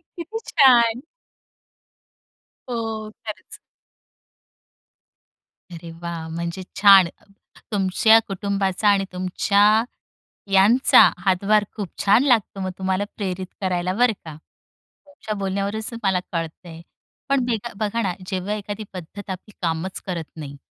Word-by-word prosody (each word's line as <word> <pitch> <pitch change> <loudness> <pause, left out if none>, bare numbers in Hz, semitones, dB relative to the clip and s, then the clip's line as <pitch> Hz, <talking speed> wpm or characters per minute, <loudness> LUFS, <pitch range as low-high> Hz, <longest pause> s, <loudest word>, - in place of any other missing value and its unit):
किती 345 +6 -6
छान! 245 -5 +5 1.7
ओह! 225 -3 -4
खरंच. 215 -1 -8 2.2
अरे 170 0 -9
वाह! 170 -1 -5
म्हणजे 170 +2 -5 0.2
छान 195 -2 +8
अ, 170 - -14 0.5
तुमच्या 205 +3 +4
कुटुंबाचा 195 0 -1
आणि 200 -1 +3
तुमच्या 185 +2 +1 0.9
यांचा 205 +7 +6 0.2
हातभार 200 +3 +2
खूप 205 -4 -4 0.2
छान 205 +5 +5
लागतो, 225 -7 +1
मग 185 0 -2
तुम्हाला 190 +1 -1
प्रेरित 190 -2 -4
करायला 180 -1 -1
बरं 245 +2 +3
का. 160 -2 -8 0.7
तुमच्या 285 -7 -7
बोलण्यावरूनच 200 +3 -2
मला 190 -2 +1
कळतंय. 165 0 -6 0.5
पण 275 -2 +2
बेघा, 235 -1 -3
बघा 215 +2 -1
ना, 190 -4 0
जेव्हा 190 +2 -3
एखादी 210 0 -6
पद्धत 190 +2 -9
आपली 190 +3 -7
कामच 170 +2 -2
करत 170 -4 -4
नाही, 145 -3 -8
195 Hz, 115 wpm, -22 LUFS, 180-215 Hz, 2.2 s, छान